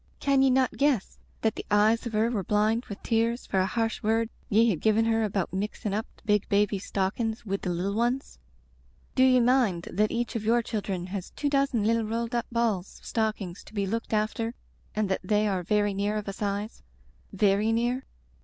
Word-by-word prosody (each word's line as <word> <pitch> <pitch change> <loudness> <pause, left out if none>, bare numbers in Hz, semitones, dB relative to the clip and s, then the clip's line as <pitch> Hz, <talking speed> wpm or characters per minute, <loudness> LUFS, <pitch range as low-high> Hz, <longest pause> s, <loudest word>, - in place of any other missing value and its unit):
Can 275 -1 +3
ye 270 - +5
not 260 0 +2
guess 275 -7 +1 0.2
that 220 -1 +2
the - - -7
eyes 215 +3 +3
of 230 - -6
her 220 +2 +2
were 205 -5 -1
blind 215 +5 +1
with 200 - -9
tears 230 +1 0
for 190 - 0
a 185 - +2
harsh 225 +1 -1
word 225 +1 +1 0.2
ye 225 +3 +5
had 170 - -3
given 220 +1 +3
her 225 0 +2
about 195 -4 -1
mixin* 205 +1 -3
up 215 +3 -2
the - - -24
big 210 -2 +1
baby's 200 -1 +1
stockings 220 +4 -2
wid 195 -1 -2
the 185 - -2
little 180 +3 -1
one's? 240 - -1 0.7
Do 260 - +4
ye 255 -1 +6
mind 240 -8 +2
that 210 +3 +2
each 235 0 -2
of 225 - -2
your 235 +2 +3
children 195 -5 -3
has 195 -3 -4
two 290 - -2
dozen 275 -6 +2
little 230 +2 +2
rolled 230 +2 -2
up 235 -1 -1
balls 225 -6 -1
of - - -19
stockings 215 -6 -2
to - - -15
be 200 -1 0
looked 230 +4 -3
after 220 +2 -1 0.4
and 215 -1 +1
that 190 - -1
they 210 +2 +2
are 190 -3 0
very 205 +2 +1
near 205 +2 -1
of 210 - -5
a 195 - -3
size 205 +2 -3 0.3
— - - -18
^very 205 +2 +3
near? 240 +3 0
215 Hz, 210 wpm, -27 LUFS, 200-230 Hz, 0.7 s, ye